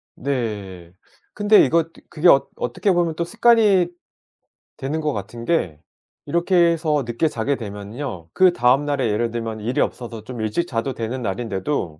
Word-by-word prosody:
네. 105 -10 -4 0.4
근데 210 0 +5
이거 165 +5 +2
드 - - -18
그게 170 +1 +1
어떻게 135 - +2
보면 170 -2 +1
또 170 - -1
습관이 215 -3 +4 0.9
되는 150 +4 -3
것 150 -1 -1
같은 115 +3 -6
게 90 - 0 0.5
이렇게 170 +2 0
해서 165 -4 +3
늦게 120 +7 0
자게 135 0 -1
되면은요. 105 - -7
그다음 145 -7 +4
날에 140 -4 0
예를 115 +2 0
들면 115 -2 -4
일이 120 +4 0
없어서 115 -3 -4
좀 120 -2 -6
일찍 110 +11 -1
자도 125 0 -2
되는 120 +3 -4
날인데도 95 - -3
130 Hz, 305 characters per minute, -21 LUFS, 110-165 Hz, 0.9 s, 근데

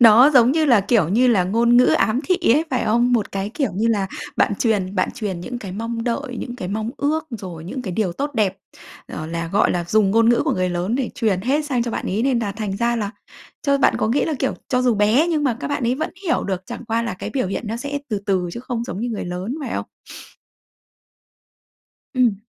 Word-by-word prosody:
Đó, 240 +4 +8
giống 245 0 +6
như 320 +1 +2
là, 240 -8 +5
kiểu 200 -4 +2
như 235 +8 +3
là, 195 -6 +3
ngôn 235 +5 +3
ngữ 250 - +7
ám 230 +4 +2
thị 365 - +4 0.2
ấy, 305 +6 +3
phải 255 -2 0
không? 240 +3 +2
Một 225 -4 0
cái 195 +1 -3
kiểu 270 -7 0
như 215 +4 0
là 205 -4 +1 0.3
bạn - - +3
truyền 205 -5 0
bạn - - +1
truyền 195 -6 -4
những 245 +7 -5
cái 195 -6 -7
mong 230 +3 -4
đợi, 250 +1 -2
những 245 0 -6
cái 185 -7 -5
mong 215 +2 -2
ước, 305 +2 -1
rồi 185 -8 -7
những 250 +9 -5
cái 190 -6 -4
điều 185 -3 0
tốt 285 +10 -3
đẹp, 200 -4 +1 0.5
ờ, 155 - -6
là, 165 0 -3
gọi 200 - +3
là, 175 -1 -1
dùng 200 +3 +2
ngôn 225 +2 +4
ngữ 240 - +4
của - - +1
người 185 0 0
lớn 175 +5 -1
để 260 -1 -1
truyền 210 -6 0
hết 275 +8 0
sang 260 -5 0
cho 235 - -3
bạn - - -3
ấy, 205 +4 -1
nên 260 -2 +2
là 210 -4 -2
thành 205 -2 -4
ra 235 +2 +1
là 205 -3 -2 0.5
chơ 280 -1 +2
bạn - - +4
có - - +1
nghĩ 255 +6 +2
là, 315 - -1
kiểu, 270 - 0
cho 250 -1 +1
dù 245 -2 +3
bé 215 +9 +3
nhưng 310 -3 0
mà 245 -5 +1
các - - -3
bạn 285 -1 -2
ấy 245 - +2
vẫn 315 +5 -3
hiểu 335 - +1
được, 190 -2 -2
chẳng - - -7
qua 225 +1 0
là 235 -6 -3
cái - - -6
biểu 260 -7 -1
hiện 195 - -3
nó 220 +2 -3
sẽ 285 +3 -3
từ 210 -4 -1
từ 185 -3 +1
chứ 235 - -6
không 245 -2 -3
giống 190 -3 -5
như 240 - -2
người 225 -3 -4
lớn, 180 +7 -4
phải - - -4
không? - - -3 2.3
Ừm. 245 -6 +3
230 Hz, 255 wpm, -21 LUFS, 195-250 Hz, 2.3 s, Đó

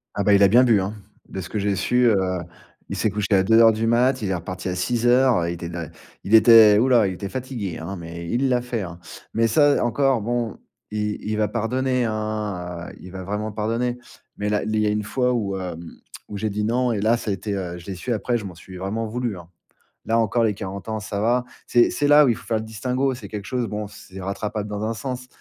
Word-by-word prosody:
Ah, 100 - 0
bah, 105 +1 +4
il 100 - +5
a 100 - +8
bien 120 +6 +6
bu, 115 -6 +4
hein, 100 +3 -4 0.3
de 95 - -6
ce 90 -2 -7
que 105 - -2
j'ai 100 0 0
su, 95 +6 0
heu, 110 -3 +4 0.7
il - - -3
s'est 110 - +1
couché 105 0 -2
à 95 -1 +5
2:00 115 +3 +6
du 110 +1 -1
mat, 125 +3 +2
il 100 - -1
est - - +1
reparti 90 +2 -6
à 90 - -2
6:00, 120 -1 +2
il 85 - -2
était 85 0 -6
da 85 -2 -5 0.4
il 100 - -3
était 110 -2 +8
ouh 125 - +3
là, 120 -4 +5
il 95 - -2
était 100 +2 -6
fatigué, 120 -7 -5
hein, 85 +5 -6
mais 85 -1 -8
il 130 +6 +1
l'a 125 -1 +2
fait, 120 -2 -3
hein. 90 -2 -7 0.4
Mais 115 - +3
ça 145 +5 +4
encore, 135 0 +2
bon, 120 0 -2 0.3
il 105 0 -2
il 105 0 -2
va 105 -1 +2
pardonner, 125 +3 0
hein, 105 -6 -3
heu, - - -12
il 90 - -11
va 95 0 -7
vraiment 105 +3 -3
pardonner. 115 +4 -2 0.4
Mais 105 0 -2
là 105 0 0
il 110 - -2
y 105 - +2
a - - +2
une 105 0 -1
fois 125 +4 0
où, 100 -5 -1
heu, 90 -3 -4 0.5
où 105 - -6
j'ai 110 +2 -1
dit 105 +1 -2
non 120 +3 +1
et 105 -3 -1
là, 110 +3 +3
ça 115 - -5
a - - +1
été, 100 +2 -4
heu 90 -3 -4
je 85 - -12
l'ai 100 - -5
su 120 +8 -5
après, 120 +2 0
je 105 - -8
m'en 90 -3 -8
suis 90 +2 -11
vraiment 100 +5 -3
voulu, 115 -2 -3
hein. 85 -2 -12 0.6
Là 115 +1 +2
encore, 115 +1 +1
les 110 -2 +2
40 100 0 -7
ans, 110 0 -2
ça 105 -1 -4
va. 120 +4 +1 0.2
C'est 120 -1 +4
c'est 145 - 0
là 145 +1 +7
où - - +3
il 115 - +2
faut - - -13
faire 115 - 0
le 110 - -4
distinguo, 125 +4 -1
c'est 115 -5 -9
quelque 105 -1 -6
chose, 125 0 -1
bon, 105 0 -4
c'est 95 -1 -11
rattrapable 105 +2 -4
dans 105 0 -4
un 110 +1 -1
sens, 125 +3 -5
105 Hz, 255 wpm, -23 LUFS, 100-120 Hz, 0.7 s, a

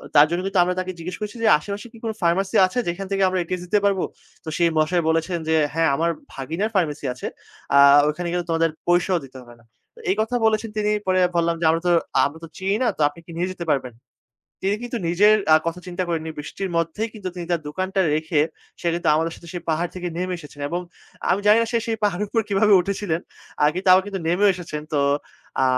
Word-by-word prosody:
তার 145 - +9
জন্য 175 +1 -1
কিন্তু 195 -1 +1
আমরা 180 +1 0
তাকে 185 0 -3
জিজ্ঞেস 180 +2 -6
করছি 210 +2 -5
যে, - - +4
"আশেপাশে 200 +8 -6
কি - - -13
কোনো 220 -1 -2
ফার্মেসি 190 +3 +1
আছে 245 +7 -2
যেখান 185 +3 -3
থেকে 195 0 +1
আমরা 185 0 -1
ATS 180 +1 -4
দিতে 210 +3 +2
পারবো?" 195 -2 +2 0.4
তো 160 - -6
সেই 170 -1 +3
মশাই 170 +3 +2
বলেছেন 165 +2 0
যে, 160 - +3 0.2
"হ্যাঁ, 165 -1 +2
আমার 165 +2 +1 0.2
ভাগিনার 165 +11 -3
ফার্মেসি 150 -6 0
আছে, 125 - -6 0.5
আ - - +8 0.3
ওখানে 175 +3 -3
গেলে 175 0 0
তোমাদের 165 0 +2 0.2
পয়সাও 175 0 +3
দিতে 130 0 -13
হবে 120 -1 -15
না।" - - -25 0.3
তো - - -16
এই - - +1
কথা 235 +3 -1
বলেছেন 220 0 +1
তিনি। 210 0 +1 0.2
পরে 185 0 +3 0.2
বললাম 170 0 +2
যে, - - +1
"আমরা 165 +1 +2
তো - - +4 0.3
আমরা 145 +3 -4
তো 165 - -7
চিনি 195 +1 0
না, 245 - +2
তো - - -3
আপনি 145 - -15
কি 170 - -11
নিয়ে 180 +2 0
যেতে 175 -2 -6
পারবেন?" 130 -3 -1 0.7
তিনি 200 +2 +1
কিন্তু 240 -1 -4
নিজের 205 +5 +5 0.2
আ - - +9
কথা 165 +2 -2
চিন্তা 180 0 -3
করেননি 160 -1 -2
বৃষ্টির 185 +5 -5
মধ্যেই 165 +7 -1
কিন্তু 200 -4 -5
তিনি 175 -1 -6
তার 170 - +1
দোকানটা 190 +5 -2
রেখে 155 0 +1 0.4
সে - - -5
কিন্তু 175 0 -1
আমাদের 160 +1 0
সাথে 170 - -14
সেই 175 - -5
পাহাড় 165 +2 0
থেকে 180 -1 -4
নেমে 180 0 -2
এসেছেন 150 -2 -12
এবং 175 +4 -2 0.5
আমি 195 - +2
জানি 210 +2 +7
না - - -1
সে 235 - +3
সেই 225 -1 -1
পাহাড়ের 205 +1 0
উপর 225 - +1
কিভাবে 205 +1 +3
উঠেছিলেন। 190 -3 -2 0.4
আ - - +6
কিন্তু 185 +2 -4
তাও 185 0 +8
কিন্তু 200 -1 -4
নেমেও 200 +4 +4
এসেছেন। 160 -4 -6
তো 150 - +2 0.6
আ - - +5
180 Hz, 230 wpm, -22 LUFS, 165-195 Hz, 0.7 s, তার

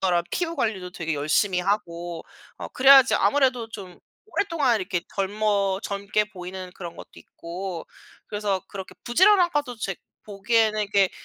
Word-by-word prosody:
사람 175 -2 +1
피부 335 -1 -2
관리도 190 -5 -2
되게 165 -3 -3
열심히 155 +6 +1
하고 175 -4 -3 0.3
어 - - -7
그래야지 265 0 +7
아무래도 260 -5 +2
좀 190 -5 -10 0.3
오랫동안 305 - 0
이렇게 180 -2 -2
젊어 200 -1 0
젊게 200 +1 -1
보이는 185 -2 -8
그런 170 -2 -8
것도 - - -11
있고 175 0 -7 0.4
그래서 205 -3 -2
그렇게 195 -1 -8
부지런한 365 +7 +5
것도 290 -5 -2
제 200 -3 -3 0.3
보기에는 215 +1 +1
이게 200 -2 +2
200 Hz, 335 characters per minute, -24 LUFS, 180-235 Hz, 0.4 s, 그래야지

